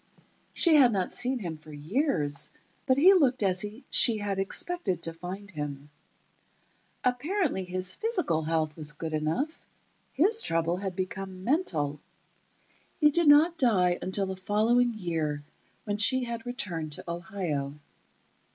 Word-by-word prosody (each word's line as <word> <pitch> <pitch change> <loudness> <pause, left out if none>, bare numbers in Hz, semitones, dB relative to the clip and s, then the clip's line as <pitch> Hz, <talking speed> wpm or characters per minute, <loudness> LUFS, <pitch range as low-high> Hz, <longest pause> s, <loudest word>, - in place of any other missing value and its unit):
She 330 -3 +4
had 255 -4 +6
not 190 -4 -1
seen 255 +2 +1
him 170 -8 -5
for 155 0 -14
years, 150 - -1 0.4
but 260 -1 +3
he 360 +7 +7
looked 260 - +3
as 185 -1 +1 0.3
she 230 -3 +5
had 200 -2 -3
expected 195 - -1
to 165 - -1
find 185 +5 -8
him. 145 -2 -6 1.1
Apparently, 265 - 0
his 185 0 -1
physical 365 - 0
health 155 -1 -1
was 150 -2 -4
good 160 +1 -6
enough; 160 - -2 0.5
his 425 +9 +3
trouble 165 +1 0
had 190 -1 -4
become 185 0 -5
mental. 160 - 0 1.0
He 300 -2 +5
did 340 +1 +2
not 315 +4 +6
die 185 -8 +3
until 190 +2 -1
the 190 0 -4
following 225 +5 +1
year, 160 -7 -2 0.4
when 205 -1 -2
she 260 +5 +4
had 235 0 -5
returned 175 - -3
to - - -6
Ohio. 170 -5 -4
195 Hz, 140 wpm, -28 LUFS, 165-255 Hz, 1.1 s, he